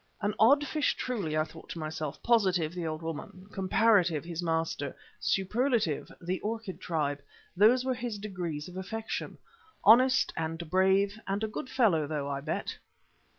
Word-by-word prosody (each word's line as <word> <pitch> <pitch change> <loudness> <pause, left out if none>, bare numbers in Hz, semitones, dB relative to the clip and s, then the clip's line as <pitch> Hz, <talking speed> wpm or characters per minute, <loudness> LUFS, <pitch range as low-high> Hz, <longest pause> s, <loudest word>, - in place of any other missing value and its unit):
An 205 0 0
odd 280 +7 +6
fish 300 +1 0
truly, 195 -12 -2
I 155 - +3
thought 160 +1 -12
to - - -6
myself. 155 -2 -5
Positive, 185 -9 +2
the 175 -2 -3
old 155 +1 -4
woman; 165 +3 -6
Comparative, 190 -4 +3
his 170 0 -4
master; 160 -4 -1 0.2
Superlative, 215 - 0
the 180 +1 -2
orchid 220 -2 -4
tribe. 145 -4 -1 0.3
Those 235 +7 +5
were 260 - +1
his 240 -3 -4
degrees 180 -7 -4
of 180 0 -9
affection. 220 +4 -4 0.5
Honest 255 +4 +6
and 165 +1 -3
brave 190 +3 +3
and 200 +2 -1
a - - +1
good 215 +4 -6
fellow 190 - +3
though, 145 -2 -2
I 140 -1 -3
bet. 155 - -3
185 Hz, 155 wpm, -30 LUFS, 160-220 Hz, 0.5 s, odd